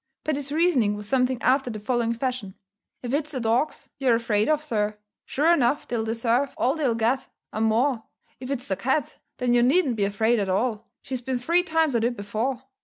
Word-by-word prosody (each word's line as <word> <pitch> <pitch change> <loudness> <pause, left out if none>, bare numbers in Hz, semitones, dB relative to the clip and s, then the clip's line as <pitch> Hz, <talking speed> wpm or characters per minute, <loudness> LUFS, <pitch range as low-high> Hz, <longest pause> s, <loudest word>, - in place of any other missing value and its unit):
Paddy's 290 -2 -2
reasoning 295 -10 +2
was 205 0 -6
something 255 0 +1
after 265 0 +2
the 215 -2 -5
following 235 +1 0
fashion: 240 -6 -3 0.5
"If 245 +1 -3
it's 300 +1 -1
the 260 - -2
dogs 235 +6 0
you're 255 -4 +3
afraid 225 -1 +1
of, 305 -1 +2
sir, 210 -7 -1 0.3
sure 315 +5 +3
enough 280 -2 +1
they'll 235 -2 -1
deserve 230 +4 0
all 260 - +2
they'll 280 -7 0
get, 235 +4 0 0.3
and 220 +1 +1
more; 230 +1 +1 0.3
if 255 0 -7
it's 260 -3 -3
the 190 - 0
cat, 265 +6 -1 0.2
then 250 -1 +1
you 240 - +5
needn't 260 -1 +3
be 200 - +2
afraid 220 +4 +1
at 195 -2 -1
all, 220 +3 -1 0.2
she's 255 -1 -4
been 260 +1 -2
three 335 +9 +2
times 320 -4 +1
at 230 -1 +1
it 240 0 0
before. 225 +6 -3
245 Hz, 200 wpm, -25 LUFS, 225-275 Hz, 0.5 s, you